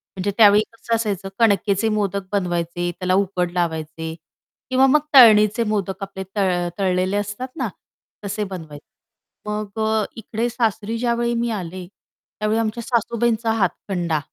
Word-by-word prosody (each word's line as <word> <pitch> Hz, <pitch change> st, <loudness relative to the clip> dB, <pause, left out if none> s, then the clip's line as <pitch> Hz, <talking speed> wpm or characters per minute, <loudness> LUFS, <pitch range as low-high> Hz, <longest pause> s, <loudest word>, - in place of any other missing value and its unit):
म्हणजे 195 Hz, +2 st, -1 dB
त्यावेळी 210 Hz, -1 st, +7 dB
कसं 230 Hz, 0 st, -2 dB
असायचं, 205 Hz, -4 st, -2 dB
कणकेचे 205 Hz, -1 st, +2 dB
मोदक 200 Hz, -2 st, -1 dB
बनवायचे 175 Hz, -2 st, -1 dB
त्याला 185 Hz, -1 st, 0 dB
उकड 180 Hz, -2 st, -2 dB
लावायचे. 160 Hz, -2 st, -3 dB, 0.6 s
किंवा 260 Hz, +1 st, +4 dB
मग 295 Hz, +3 st, +5 dB
तळणीचे 220 Hz, -3 st, +7 dB
मोदक 195 Hz, -2 st, -2 dB
आपले 190 Hz, -1 st, -6 dB
तळ 180 Hz, -3 st, +1 dB
तळलेले 185 Hz, +1 st, +1 dB
असतात 205 Hz, +5 st, -3 dB
ना 255 Hz, -5 st, -1 dB, 0.6 s
तसे 205 Hz, +2 st, -2 dB
बनवायचे. 165 Hz, -4 st, -8 dB, 0.6 s
मग 210 Hz, 0 st, -4 dB
अ, 220 Hz, 0 st, +1 dB
इकडे 225 Hz, +1 st, -3 dB
सासरी 225 Hz, -2 st, -1 dB
ज्यावेळी 235 Hz, 0 st, 0 dB
मी 235 Hz, 0 st, 0 dB
आले, 180 Hz, +1 st, -7 dB
त्यावेळी 215 Hz, +3 st, -5 dB
आमच्या 225 Hz, +1 st, -2 dB
सासूबाईंचा 235 Hz, -1 st, 0 dB
हातखंडा, 180 Hz, -6 st, -1 dB
205 Hz, 135 wpm, -21 LUFS, 185-225 Hz, 0.6 s, त्यावेळी